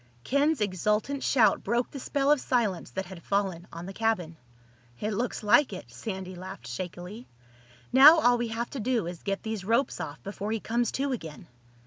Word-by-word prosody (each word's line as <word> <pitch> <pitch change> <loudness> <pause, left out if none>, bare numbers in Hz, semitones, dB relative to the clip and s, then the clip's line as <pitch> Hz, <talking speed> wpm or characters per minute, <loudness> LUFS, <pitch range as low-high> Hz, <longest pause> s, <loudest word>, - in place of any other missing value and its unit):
Ken's 285 0 +1
exultant 210 +8 0
shout 240 -5 +3
broke 235 +4 0
the 275 - -7
spell 280 +2 +1
of 295 -3 +3
silence 220 -8 0
that 190 0 -4
had 175 -1 -10
fallen 190 -3 -1
on 165 +1 -7
the 195 - -7
cabin. 190 -7 -1 0.6
"It 215 - -2
looks 235 +2 -2
like 210 +6 +5
it." 150 -10 -9
Sandy 185 - -6
laughed 185 -7 -9
shakily. 180 - -7 0.7
"Now 290 +5 +10
all 245 -4 +4
we 240 - -1
have 230 +1 -4
to 275 - -5
do 235 -3 0
is 175 0 -6
get 200 -1 -3
these 220 -3 -4
ropes 230 +7 +1
off 145 -1 -6
before 205 +1 -5
he 225 - -1
comes 235 +3 0
to 275 +1 -1
again." 160 - -6
210 Hz, 185 wpm, -28 LUFS, 185-245 Hz, 0.7 s, Now